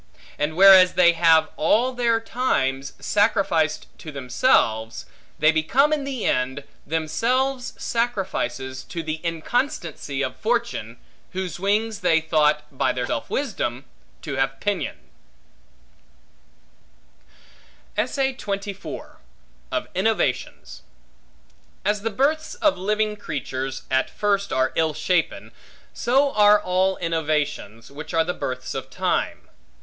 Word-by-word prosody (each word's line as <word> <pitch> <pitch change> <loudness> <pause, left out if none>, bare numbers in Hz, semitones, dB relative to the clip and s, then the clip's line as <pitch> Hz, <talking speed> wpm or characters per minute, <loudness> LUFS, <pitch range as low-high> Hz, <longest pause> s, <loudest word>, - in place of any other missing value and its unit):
And 150 +2 -1
whereas 190 -1 +8
they 175 -2 +6
have, 165 -1 +4
all 230 +11 +2
their 235 -2 +2
times, 140 - -1
sacrificed 180 -7 +1
to 155 - -8
themselves, 120 - +1 0.3
they 155 +1 +5
become 255 - +2
in 290 -2 -1
the 265 -5 -4
end, 130 +2 0 0.2
themselves 245 - 0
sacrifices 190 - -2
to 165 -2 -5
the 155 0 -4
inconstancy 165 - -2
of 130 -1 -3
fortune, 230 - -2 0.4
whose 185 -3 -4
wings 210 +3 0
they 160 -4 +3
thought, 155 -2 +2
by 130 -1 +1
their 125 -1 -2
self 115 - -3
wisdom, 160 - -2 0.4
to 140 -4 -4
have 135 0 0
pinioned. 205 -3 -2 3.0
Of - - 0 1.8
Innovations 220 +4 -1 1.0
AS 210 0 +1
THE 225 - -1
births 295 +8 0
of 305 -3 +2
living 210 +3 -1
creatures, 135 -6 -4
at 130 0 +2
first 200 -1 0
are 130 0 +1
ill 160 -2 +1
shapen, 170 +2 -1 0.4
so 275 +3 +2
are 210 0 +6
all 190 0 +1
innovations, 150 -8 -2
which 155 +3 -7
are 165 - +4
the 180 +2 -2
births 130 -4 -4
of 135 0 -5
time. - - -2
170 Hz, 115 wpm, -23 LUFS, 140-215 Hz, 3.0 s, whereas